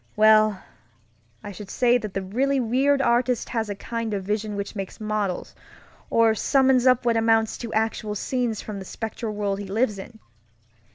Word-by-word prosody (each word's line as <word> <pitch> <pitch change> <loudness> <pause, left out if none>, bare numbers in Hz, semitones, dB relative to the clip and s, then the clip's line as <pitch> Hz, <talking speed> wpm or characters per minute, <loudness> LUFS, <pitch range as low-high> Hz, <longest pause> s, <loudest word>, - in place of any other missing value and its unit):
Well, 215 -2 +5 0.8
I 205 - -6
should 200 +1 -10
say 245 0 +3
that 215 -4 -7
the 195 - -2
really 265 +8 0
weird 270 +4 +2
artist 245 0 +1
has 225 -3 -2
a 205 - -3
kind 230 +1 -4
of 195 - -3
vision 210 +1 -2
which 200 +2 -5
makes 195 -2 -6
models, 210 -3 -2 0.6
or 230 -1 +4
summons 260 +2 +3
up 255 -1 +4
what 235 -1 +2
amounts 225 -1 +2
to 235 -2 -6
actual 220 -1 -1
scenes 240 0 -2
from 210 -2 -6
the 190 - -8
spectral 220 +1 -5
world 200 -1 -2
he 200 - -6
lives 210 0 0
in. 220 +4 -10
220 Hz, 175 wpm, -24 LUFS, 205-240 Hz, 0.8 s, Well